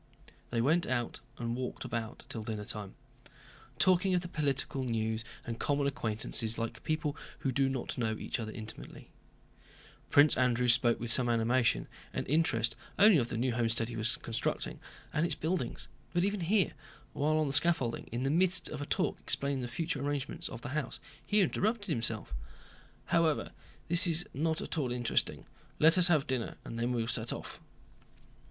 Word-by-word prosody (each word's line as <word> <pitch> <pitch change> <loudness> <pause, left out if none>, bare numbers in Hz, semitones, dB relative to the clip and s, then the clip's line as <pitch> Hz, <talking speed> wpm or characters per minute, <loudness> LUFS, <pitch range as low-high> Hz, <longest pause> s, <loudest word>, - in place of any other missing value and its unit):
They 115 -1 0
went 160 +8 +3
out 120 -2 -1 0.2
and 120 -1 -2
walked 125 0 -4
about 115 -1 -4
till 115 - -5
dinnertime, 105 -2 -5 0.8
talking 185 +2 +4
of 180 - +2
the 175 - -5
political 140 -4 -1
news 110 -2 -1 0.2
and 115 -1 -5
common 145 -1 +1
acquaintances 115 -3 0
like 115 0 -4
people 155 -2 -1 0.3
who 135 - 0
do 135 +1 +2
not 130 -1 -3
know 110 -2 0
each - - -3
other 110 -1 -4
intimately. 110 0 -9 1.0
Prince 145 +1 +6
Andrew 125 -1 +2
spoke 120 0 +4
with 120 0 +2
some 125 -1 +5
animation 115 +1 +2 0.3
and - - -3
interest 120 -7 +2 0.2
only 205 -5 +7
of 120 - 0
the 120 - -3
new 125 +1 +1
homestead 115 -1 0
he 120 - -6
was 110 +1 0
constructing 115 -1 -2 0.3
and 150 - +1
its 170 -3 +1
buildings, 160 -6 -2 0.3
but 175 - +3
even 205 0 -1
here, 195 +3 +2 0.4
while 155 +2 +1
on 155 - +2
the 140 - -2
scaffolding, 145 -8 +2
in 120 +2 -2
the 135 - +1
midst 180 +1 +3
of 150 - -5
a 145 - -4
talk - - 0
explaining 140 -1 0
the 125 - -3
future 150 +2 -2
arrangements 145 -1 -2
of 115 - -8
the - - -4
house, 150 +1 -3 0.2
he 210 0 +3
interrupted 205 +2 0
himself: 115 - -1 0.7
"However, 165 -3 +2 0.4
this 170 +1 +5
is 170 +1 0
not 160 +3 0
at - - -2
all 130 -4 -1
interesting. 120 -1 0 0.3
Let 160 +2 +6
us 180 -1 +5
have 155 -5 +3
dinner, 130 -4 -2
and 115 - -5
then 120 +2 0
we'll 115 -2 0
set - - -1
off." - - -7
130 Hz, 175 wpm, -32 LUFS, 115-160 Hz, 1.0 s, only